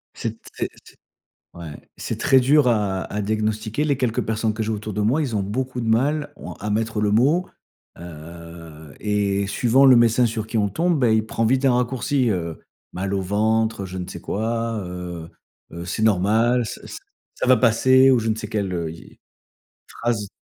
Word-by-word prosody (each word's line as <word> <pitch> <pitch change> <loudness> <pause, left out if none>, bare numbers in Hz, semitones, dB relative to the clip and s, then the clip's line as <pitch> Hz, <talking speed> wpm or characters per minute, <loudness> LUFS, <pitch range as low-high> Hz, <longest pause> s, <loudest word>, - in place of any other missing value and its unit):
C'est - - -5
très - - -5 0.2
c'est - - -17 0.6
ouais, 80 -4 -10
c'est - - -5
très 135 - +5
dur 140 +1 +4
à 100 -5 +1
à 105 - -4
diagnostiquer. 110 +5 -1
Les 140 -2 +1
quelques 120 -4 0
personnes 110 0 -1
que 110 0 -3
j'ai 110 - -2
autour 105 0 -4
de 105 - -3
moi, 130 +9 +2
ils 130 -6 -2
ont 100 - +1
beaucoup 125 +5 -3
de 115 - -3
mal 145 +7 +1
on - - -9
à 105 - -6
mettre 110 +1 -1
le 105 - +1
mot, 145 - +3 0.5
heu 85 -2 -11
et 100 -1 0
suivant 125 +6 +3
le 130 -2 +8
médecin 120 +1 +4
sur 110 -1 -2
qui 110 0 -3
on 100 -1 +2
tombe, 165 - 0
bah, 120 -3 +3
il 110 0 +2
prend 115 +1 -1
vite 130 +3 +2
un 130 - +4
raccourci, 125 +1 0
heu, 85 -4 -3 0.3
mal 95 +2 -3
au 95 - 0
ventre, 110 +2 0
heu, - - -5
je 95 0 -7
ne 90 0 -5
sais - - -7
quoi, 115 0 -2
heu 90 -2 -7 0.4
heu, 85 +1 -7
c'est 110 +4 -2
normal 110 +4 +3
s 115 - -5
s - - -8 0.4
ça - - -2
va 130 - +7
passer 130 +3 +5
ou 125 - +4
je 115 0 -2
ne 110 - +1
sais - - -6
quel, 100 -3 -2
heu, 85 -2 -3
y 80 - -11
est, - - -19 0.7
phrase. 115 -3 -2
110 Hz, 205 wpm, -22 LUFS, 100-120 Hz, 0.7 s, le